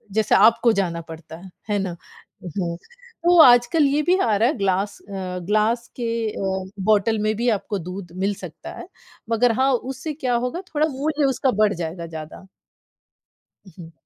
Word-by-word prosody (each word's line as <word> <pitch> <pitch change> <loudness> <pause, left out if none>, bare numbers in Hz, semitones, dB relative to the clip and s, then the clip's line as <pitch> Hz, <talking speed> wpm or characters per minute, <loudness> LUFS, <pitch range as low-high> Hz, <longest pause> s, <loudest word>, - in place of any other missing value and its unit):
जैसे 220 -1 +3
आपको 230 +3 +5
जाना 175 -5 -1
पड़ता 160 -1 -11
है, 190 +2 -12 0.2
है 205 -1 +1
ना? 190 -3 -3 0.5
हुँ, 170 -1 -3 0.5
तो 350 +1 +5
आजकल 245 +3 +6
ये 285 +2 +2
भी 365 +1 +4
आ 220 -3 +2
रहा 225 +3 +3
है, 285 - -2
ग्लास 195 0 0
अ, 200 - -12 0.3
ग्लास 215 +4 +1
के 240 - -4 0.3
अ, 190 -1 -3 0.2
बॉटल 215 +1 +3
में 215 +1 0
भी 240 +3 0
आपको 205 -2 -2
दूध 180 +1 -8
मिल 195 +2 0
सकता - - -10
है, - - -9 0.4
मगर 230 +1 +3
हाँ, 270 +1 +3
उससे 265 +5 -4
क्या 260 -4 -2
होगा 250 +8 -2
थोड़ा 305 +1 +3
मूल्य 295 +1 -1
उसका 265 0 +1
बढ़ 210 -1 +4
जाएगा 170 0 -5
ज़्यादा। 160 +3 -9 1.2
उ, - - -14
हुँ। 165 -2 -11
215 Hz, 175 wpm, -22 LUFS, 190-250 Hz, 1.2 s, आजकल